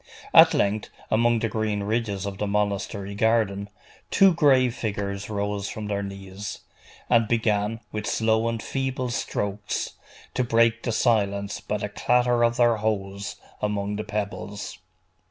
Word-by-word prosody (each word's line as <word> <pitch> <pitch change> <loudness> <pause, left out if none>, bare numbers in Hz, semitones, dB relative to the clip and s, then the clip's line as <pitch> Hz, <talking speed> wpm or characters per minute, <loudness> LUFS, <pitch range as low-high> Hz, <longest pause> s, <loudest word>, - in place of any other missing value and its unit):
At - - +8
length, 105 +1 0 0.2
among 115 +1 +3
the 115 0 0
green 110 -2 -1
ridges 105 -2 -1
of 100 -1 -5
the 105 - -1
monastery 100 0 -1
garden, 105 -2 +1 0.4
two 195 -2 +6
gray 135 -6 +4
figures 100 -3 -4
rose 100 -1 -2
from 110 - -5
their 100 -1 -1
knees, 100 0 -7 0.5
and 115 -2 +4
began, 110 -1 +1
with 105 -1 -4
slow 110 +1 +2
and 115 -2 -3
feeble 130 -2 -2
strokes, 105 -2 -2 0.4
to 130 - +1
break 115 -1 +3
the 120 - -2
silence 100 -3 +1
by 105 - -2
the 105 0 -4
clatter 120 +2 +2
of 120 0 +2
their 120 -2 +4
hoes 100 -2 -2 0.3
among 105 -1 -1
the 105 - -3
pebbles. 105 -1 -5
105 Hz, 145 wpm, -25 LUFS, 100-115 Hz, 0.5 s, At